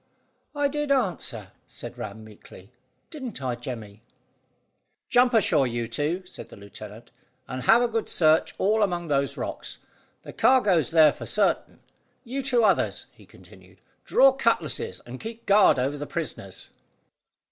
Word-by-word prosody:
"I 290 Hz, 0 st, +2 dB
did 295 Hz, 0 st, -3 dB
answer," 170 Hz, -, -1 dB, 0.2 s
said -, -, -9 dB
Ram 110 Hz, -, -8 dB
meekly. 105 Hz, -1 st, -15 dB, 0.4 s
"Didn't 265 Hz, -8 st, -7 dB
I, 130 Hz, -2 st, -2 dB
Jemmy?" 115 Hz, -4 st, -8 dB, 1.1 s
"Jump 245 Hz, 0 st, +4 dB
ashore, 170 Hz, -, +3 dB
you 120 Hz, -1 st, -3 dB
two," 155 Hz, +10 st, -2 dB
said -, -, -11 dB
the -, -, -13 dB
lieutenant, 105 Hz, +2 st, -12 dB, 0.4 s
"and 130 Hz, 0 st, -5 dB
have 235 Hz, -, +5 dB
a -, -, +2 dB
good 225 Hz, -1 st, -3 dB
search 155 Hz, -1 st, +2 dB
all 215 Hz, +3 st, +2 dB
among 175 Hz, -5 st, -1 dB
those 140 Hz, -1 st, 0 dB
rocks. -, -, -5 dB, 0.5 s
The -, -, -10 dB
cargo's 205 Hz, -, +3 dB
there 155 Hz, -3 st, +6 dB
for -, -, -9 dB
certain. -, -, 0 dB, 0.4 s
You 265 Hz, +2 st, -4 dB
two 255 Hz, -3 st, +2 dB
others," 205 Hz, -, +1 dB
he -, -, -20 dB
continued, -, -, -18 dB, 0.2 s
"draw 270 Hz, 0 st, +5 dB
cutlasses, 230 Hz, -, -1 dB
and 125 Hz, +2 st, -9 dB
keep 225 Hz, +1 st, -8 dB
guard 200 Hz, -5 st, +5 dB
over 135 Hz, +3 st, -1 dB
the 145 Hz, -, -5 dB
prisoners." 100 Hz, -, -6 dB
165 Hz, 145 wpm, -25 LUFS, -, 1.1 s, there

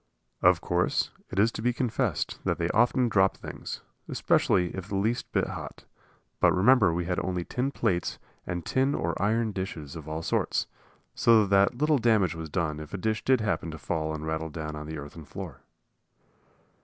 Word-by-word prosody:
Of 90 Hz, -1 st, +5 dB
course, 90 Hz, 0 st, +1 dB, 0.2 s
it -, -, -7 dB
is 110 Hz, +3 st, +4 dB
to -, -, -6 dB
be 125 Hz, +2 st, +2 dB
confessed 120 Hz, -, -1 dB
that -, -, 0 dB
they -, -, -1 dB
often 120 Hz, +2 st, +3 dB
dropped 95 Hz, -4 st, +3 dB
things, -, -, -7 dB, 0.3 s
especially 90 Hz, -1 st, +2 dB
if 95 Hz, -1 st, -6 dB
the 100 Hz, -, -4 dB
least 110 Hz, +5 st, -1 dB
bit -, -, +2 dB
hot; -, -, -7 dB, 0.5 s
but -, -, +4 dB
remember 105 Hz, 0 st, +5 dB
we 85 Hz, +1 st, -1 dB
had 90 Hz, 0 st, -1 dB
only 90 Hz, -1 st, -2 dB
tin 125 Hz, +2 st, -1 dB
plates 105 Hz, -10 st, -1 dB, 0.3 s
and 85 Hz, -1 st, -3 dB
tin 135 Hz, +2 st, +1 dB
or 85 Hz, 0 st, -1 dB
iron 110 Hz, +2 st, +1 dB
dishes 85 Hz, -7 st, -5 dB
of 80 Hz, -2 st, -8 dB
all 80 Hz, +1 st, -4 dB
sorts, -, -, 0 dB, 0.5 s
so 115 Hz, -2 st, +5 dB
that 100 Hz, +3 st, +3 dB
little 150 Hz, +1 st, +3 dB
damage 110 Hz, -7 st, +3 dB
was 80 Hz, -1 st, -6 dB
done 75 Hz, -2 st, -1 dB
if 75 Hz, +5 st, -7 dB
a -, -, -2 dB
dish 110 Hz, +3 st, -1 dB
did 130 Hz, -3 st, +3 dB
happen 100 Hz, -5 st, -1 dB
to 80 Hz, -, -6 dB
fall 80 Hz, 0 st, -2 dB
and 80 Hz, 0 st, -6 dB
rattle 80 Hz, 0 st, -2 dB
down 75 Hz, 0 st, -5 dB
on 75 Hz, 0 st, -7 dB
the 80 Hz, 0 st, -5 dB
earthen 75 Hz, +2 st, -9 dB
floor. -, -, -8 dB
95 Hz, 190 wpm, -28 LUFS, 80-115 Hz, 0.5 s, Of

